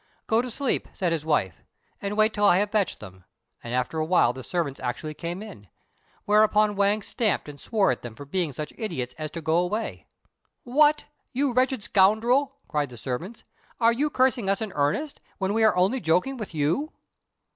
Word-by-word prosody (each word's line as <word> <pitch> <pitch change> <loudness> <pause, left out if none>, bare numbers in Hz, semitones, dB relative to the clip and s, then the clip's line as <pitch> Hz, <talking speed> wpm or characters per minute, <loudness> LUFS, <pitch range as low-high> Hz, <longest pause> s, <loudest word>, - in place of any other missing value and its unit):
"Go 225 +1 +2
to 250 - -5
sleep," 265 +2 -1
said 180 -4 -1
his 165 -3 -1
wife, 125 - 0 0.4
"and 200 +1 -3
wait 215 +1 +4
till 205 - -2
I 180 - +6
have 205 +1 0
fetched 205 -5 0
them;" 95 -3 -12 0.4
and 120 - -6
after 125 +5 -1
awhile 155 -6 +3
the 130 - -8
servants 150 -2 -3
actually 130 +5 -4
came 175 +5 -5
in; 105 - -11 0.6
whereupon 210 0 +4
Wang 200 +1 +2
stamped 220 -8 -1
and 145 -2 -10
swore 210 -4 +2
at 125 - -4
them 120 -2 -8
for 145 - -9
being 170 +1 -1
such 150 +3 -6
idiots 160 - -3
as 155 0 -3
to 165 - -7
go 160 +1 +2
away. 190 +6 -2 0.6
"What! 295 +4 +3 0.3
you 270 0 +1
wretched 255 -2 +1
scoundrel," 235 +9 +3
cried 145 -2 -1
the 120 - -11
servants, 130 - -5 0.4
"are 230 0 +4
you 290 +5 0
cursing 255 -6 +2
us 195 - +2
in 220 -3 -4
earnest, 150 - -1 0.2
when 190 +1 -1
we 225 +1 +2
are 220 - +5
only 190 +9 +2
joking 180 +10 +1
with 215 -8 -7
you!" 160 - 0
195 Hz, 190 wpm, -26 LUFS, 150-225 Hz, 0.6 s, I